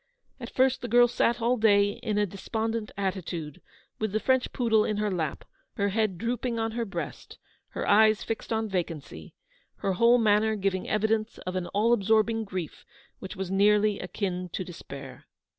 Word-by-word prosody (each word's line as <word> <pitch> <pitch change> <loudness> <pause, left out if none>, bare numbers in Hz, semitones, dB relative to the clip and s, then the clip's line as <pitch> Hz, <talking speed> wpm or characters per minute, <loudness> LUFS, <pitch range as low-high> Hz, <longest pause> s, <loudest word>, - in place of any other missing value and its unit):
At - - -7
first 260 0 +2
the 245 - -4
girl 240 +1 +6
sat 235 0 0
all 245 +2 +2
day 205 -2 +4
in 215 -3 -1
a 210 - +3
despondent 220 +3 -3
attitude, 180 -6 -4 0.4
with 215 -2 -2
the 215 - +2
French 260 +2 +1
poodle 225 -3 +2
in 215 - -1
her 210 -1 0
lap, 160 -5 -3 0.3
her 200 0 0
head 215 -2 0
drooping 235 +3 -2
on 225 0 -1
her 235 +1 -2
breast, 200 - -7 0.3
her - - -5
eyes 215 0 +5
fixed 225 - -5
on 220 0 0
vacancy, 165 - -5 0.4
her 195 - -1
whole 235 +6 +5
manner 220 -1 +3
giving 195 -2 -2
evidence 215 +1 0
of 185 0 -4
an 180 -1 -2
all 220 +4 +2
absorbing 220 +1 +2
grief 185 -6 -6 0.4
which 190 +1 -8
was 190 -1 -4
nearly 205 +1 +3
akin 180 -1 -3
to 185 - -2
despair. 140 -7 -10
210 Hz, 175 wpm, -27 LUFS, 190-225 Hz, 0.4 s, girl